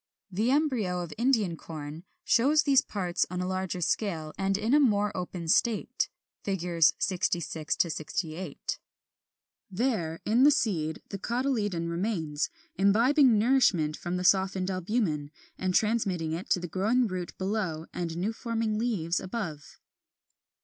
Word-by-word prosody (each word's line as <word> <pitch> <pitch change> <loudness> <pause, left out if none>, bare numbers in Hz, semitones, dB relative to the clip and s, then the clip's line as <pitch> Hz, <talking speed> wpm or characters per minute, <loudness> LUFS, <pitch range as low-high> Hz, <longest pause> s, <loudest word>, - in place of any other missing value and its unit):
The 215 +6 0
embryo 255 - +1
of 165 -3 -7
Indian 225 -8 +1
Corn 155 0 -8 0.2
shows 285 +6 +4
these 275 -2 +5
parts 185 -9 -1
on 180 0 -4
a 180 - -1
larger 185 -1 -2
scale 160 -4 -1
and 195 0 0
in 220 +5 0
a 295 - +7
more 210 -6 +2
open 180 -2 -5
state 225 +6 +1 0.3
(Fig. 180 -4 -3 0.2
66 170 -4 -1
68). 160 0 -3 0.9
There, 185 -7 -1
in 230 +4 +3
the 290 - +8
seed, 160 - 0
the 195 - -5
cotyledon 215 -7 -1
remains, 170 -4 -1 0.3
imbibing 235 +6 +4
nourishment 205 - +3
from 175 +1 -3
the 180 - -3
softened 190 0 +2
albumen, 185 -6 -1 0.3
and 185 -1 -1
transmitting 200 -7 +1
it 170 +4 -4
to - - +3
the 175 - -5
growing 215 +9 +1
root 185 -4 -5
below 190 -5 -2
and 170 -2 -3
new 200 +6 -1
forming 225 -2 -2
leaves 190 -8 0
above. 185 -7 -6
190 Hz, 135 wpm, -28 LUFS, 170-225 Hz, 0.9 s, the